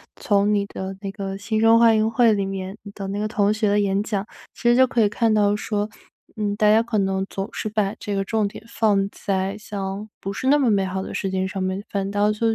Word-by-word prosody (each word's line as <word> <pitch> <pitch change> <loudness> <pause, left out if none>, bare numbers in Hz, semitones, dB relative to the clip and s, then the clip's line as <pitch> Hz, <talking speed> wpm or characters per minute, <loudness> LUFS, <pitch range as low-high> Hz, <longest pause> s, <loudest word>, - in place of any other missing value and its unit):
从 205 0 +2
你 200 - +1
的 190 -1 -6
那 195 -1 -4
个 195 -1 -5
新 215 +2 -2
生 225 +1 +6
欢 230 -1 +5
迎 215 +1 +2
会 230 0 +4
里 200 -2 +1
面 195 +1 -5 0.2
的 195 - -6
那 200 +1 -3
个 210 - -1
同 205 -1 +1
学 215 0 0
的 205 - +2
演 195 0 +1
讲， 205 -1 -2 0.3
其 - - -15
实 240 - +5
就 260 0 +6
可 240 - +1
以 210 - +4
看 225 +1 +1
到 205 -1 +3
说， 210 0 -2 0.5
嗯， 205 -1 -1
大 210 -1 +4
家 220 +1 +5
可 230 -1 -2
能 190 -1 0
总 195 0 -4
是 - - -4
把 210 -1 0
这 205 -2 -3
个 195 - 0
重 215 +1 0
点 200 - -10
放 200 -4 +1
在 195 0 -2
像 200 -1 -5
不 195 - -4
是 260 - -4
那 290 +2 +6
么 265 -6 +2
美 195 -2 +2
好 190 0 -3
的 - - -7
世 195 - -2
界 190 0 -1
上 190 0 -4
面， 185 +2 -2
反 195 -1 -2
倒 205 +1 +2
就 220 +2 0
205 Hz, 275 characters per minute, -23 LUFS, 195-215 Hz, 0.5 s, 生